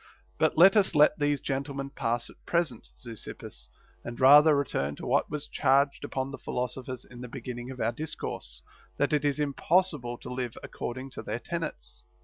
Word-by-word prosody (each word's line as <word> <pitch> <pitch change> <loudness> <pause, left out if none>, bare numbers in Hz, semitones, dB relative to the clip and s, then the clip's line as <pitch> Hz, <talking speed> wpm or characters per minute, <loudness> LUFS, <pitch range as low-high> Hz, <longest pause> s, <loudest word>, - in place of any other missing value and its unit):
But 155 0 +2
let 190 +5 +8
us 200 -5 +3
let 150 0 +5
these 145 -1 +1
gentlemen 140 0 -3
pass 120 -3 -1
at - - -22
present. 170 -9 0
Zeuxippus, 115 -3 -7 0.3
and 120 0 -7
rather 150 +3 +8
return 75 - -1
to - - -8
what - - +2
was 150 -1 -4
charged 140 +1 +2
upon 130 0 -3
the 135 - -7
philosophers 125 0 -4
in 120 -1 -12
the 125 - -6
beginning 120 0 -7
of 130 -1 -8
our 115 - +1
discourse, 90 - -6 0.3
that 145 0 +1
it 150 - +2
is 145 0 +1
impossible 150 -3 +1
to - - -8
live 125 -2 -4
according 130 +2 -6
to - - -7
their - - -3
tenets. - - -6
135 Hz, 175 wpm, -28 LUFS, 120-150 Hz, 0.3 s, let